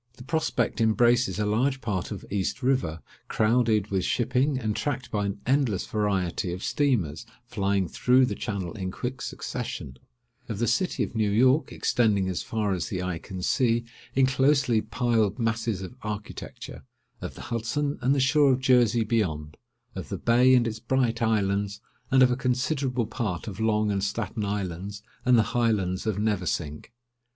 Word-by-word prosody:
The 125 - -12
prospect 125 -6 -1
embraces 120 +2 +3
a 105 - 0
large 130 +6 +1
part 105 -7 -3
of 100 -4 -7
East 100 +6 -2
River, 125 - 0 0.2
crowded 110 -2 +2
with 95 -2 +1
shipping, 125 +6 +1
and 110 -4 -2
tracked 135 -4 -3
by 105 -1 0
an 100 0 -4
endless 130 -7 +1
variety 95 -5 -1
of 90 - -6
steamers, 110 - 0 0.2
flying 100 -5 0
through 125 +8 +3
the - - -2
channel 100 -5 -4
in 95 -4 -4
quick 125 +6 -5
succession; 65 -1 -5 0.5
of 110 - -3
the 120 - 0
city 185 +8 +1
of - - -5
New 110 -2 +1
York, 130 +7 +3
extending, 100 -5 +1
as 90 - -2
far 105 -3 -1
as 90 - -2
the 90 -4 -3
eye 90 -3 -3
can 90 +1 -7
see, 120 +1 +2 0.3
in 135 0 +5
closely 130 -3 +3
piled 115 -5 0
masses 115 -4 -1
of 95 - -8
architecture; 105 0 -7 0.4
of - - -6
the - - -9
Hudson, 125 +6 -1
and 135 +3 +3
the - - +1
shore 135 +1 +4
of 125 - 0
Jersey, 120 -3 +4
beyond; 80 -10 -1 0.4
of 95 - -7
the 100 - -3
bay 125 +6 +4
and 120 -2 +3
its 110 -1 -4
bright 120 -1 0
islands, 100 -2 0 0.3
and 130 -1 +5
of 125 - +5
a - - +2
considerable 130 -1 0
part 110 -4 -3
of 100 -1 -6
Long 110 -1 +1
and 100 -1 -1
Staten 105 +1 -2
Islands, 100 0 -4 0.2
and 125 -1 +5
the 110 - +5
Highlands 105 -5 0
of 105 -3 0
Neversink. 90 -8 -2
110 Hz, 170 wpm, -26 LUFS, 100-125 Hz, 0.5 s, in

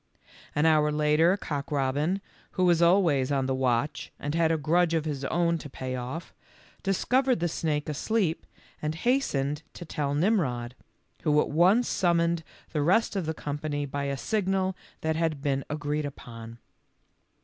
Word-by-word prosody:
An 150 +2 +2
hour 155 -1 +4
later 150 +5 +3
Cock 145 -7 -4
robin, 145 +7 0 0.3
who 185 - +2
was 175 -2 +4
always 170 -7 +4
on 135 -2 +1
the 130 - 0
watch 130 +1 0
and 145 +1 -3
had 165 0 +3
a 165 - +2
grudge 165 +3 +2
of 160 -1 0
his 145 -3 -3
own 170 +2 +1
to 145 - -9
pay 130 -1 -5
off*, 130 +7 -6 0.5
discovered 250 +6 +2
the 175 - +1
snake 155 -2 -1
asleep 170 +3 -1 0.3
and 150 +1 -2
has 250 +10 +2
tened 145 - -2
to 175 - -8
tell 145 -2 -2
Mmrod, 145 - +1 0.5
who 150 -2 +3
at - - +1
once 185 +10 +4
summoned 170 -2 +1 0.3
the 150 - +1
rest 190 +8 +2
of 185 -5 -1
the 160 - -2
company 145 0 -3
by 140 0 -3
a 140 0 -2
signal 190 - 0 0.3
that 160 0 0
had 160 -3 0
been 140 -1 -1
agreed 150 0 -2
upon. 115 -4 -10
155 Hz, 165 wpm, -27 LUFS, 140-175 Hz, 0.5 s, hour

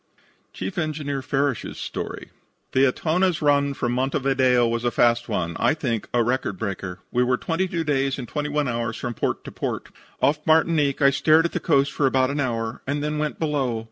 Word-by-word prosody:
CHIEF 95 - -4
ENGINEER 150 -4 -2
FARRISH'S 135 -2 -1
STORY - - -6 0.4
"The 135 +1 +4
Etona's 175 +4 +1
run 140 -1 +2
from 120 -2 -1
Montevideo 130 -1 +2
was 115 0 -1
a 120 - +2
fast 120 0 +2
one 85 -5 -2
I 155 - +3
think 120 -8 -2
a 120 -1 +2
record 120 -5 -1
breaker. 95 -3 -5
We 125 - +2
were 125 0 +2
22 170 +2 -1
days 140 -2 0
and 125 -3 -6
21 150 0 -1
hours 115 -2 -2
from 120 -1 -4
port - - -2
to - - -8
port. - - -4 0.3
Off 150 +2 +2
Martinique 155 -3 +3
I 140 - +7
stared 155 +3 +4
at 170 - -1
the - - -2
coast 140 -3 +2
for 140 - +1
about 130 0 +2
an 145 - -2
hour, 115 -3 -2
and 145 +1 -1
then 150 0 -1
went 150 -1 -2
below. 140 -7 -1
135 Hz, 190 wpm, -24 LUFS, 120-150 Hz, 0.4 s, I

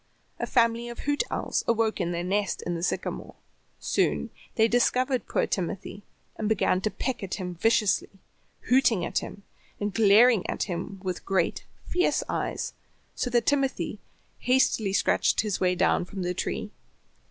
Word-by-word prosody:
A - - -2
family 235 -1 +2
of 235 - -7
hoot 290 0 0
owls - - -1
awoke 225 -3 +1
in 175 0 -1
their 170 0 -2
nest 200 +1 -1
in 175 - -2
the 165 - -3
sycamore. 175 - -3 0.4
Soon - - 0 0.2
they 220 0 +4
discovered 250 +2 +1
poor - - +1
Timothy, 195 +2 -4 0.4
and 215 - -1
began 190 -3 +2
to 215 - 0
peck 255 +3 -3
at 195 -2 -3
him 180 -2 -5
viciously, 210 +1 +2 0.5
hooting 235 -7 +3
at - - 0
him, 200 - -9 0.4
and 205 -1 -2
glaring 220 0 +6
at - - -1
him 185 +1 -5
with 185 -2 -3
great, 190 -3 0 0.2
fierce 360 +1 +1
eyes, - - -3 0.4
so 250 - -2
that 240 -1 +2
Timothy 275 -2 0 0.4
hastily 250 -5 +2
scratched 195 - +2
his 210 -3 -2
way 180 -1 +2
down 180 - +2
from 190 0 -6
the 180 0 -1
tree. 210 - -3
210 Hz, 160 wpm, -27 LUFS, 185-240 Hz, 0.5 s, glaring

